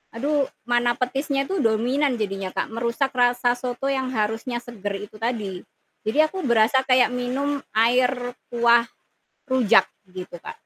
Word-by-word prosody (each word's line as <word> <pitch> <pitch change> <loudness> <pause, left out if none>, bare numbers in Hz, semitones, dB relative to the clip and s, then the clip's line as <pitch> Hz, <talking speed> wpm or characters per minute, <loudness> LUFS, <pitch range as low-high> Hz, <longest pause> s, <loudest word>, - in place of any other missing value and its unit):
aduh 285 +4 +1 0.2
mana 240 0 +2
petisnya 275 +2 -1
itu 380 -6 -1
dominan 245 +4 +1
jadinya 195 -2 -3
Kak - - -2
merusak 240 +4 -1
rasa 245 0 +3
soto 245 +2 -4
yang 265 -2 -1
harusnya 225 +2 -2
seger 205 -4 -6
itu 215 - -20
tadi. 215 -5 -3 0.4
Jadi 220 +5 -2
aku 375 +3 -6
berasa 235 +1 +3
kayak 255 -1 +4
minum 270 +3 -2
air 245 +4 +3 0.4
kuah 235 0 +4 0.7
rujak 250 -4 +4 0.2
gitu 180 -1 -8
Kak. - - -6
245 Hz, 140 wpm, -23 LUFS, 225-265 Hz, 0.7 s, kayak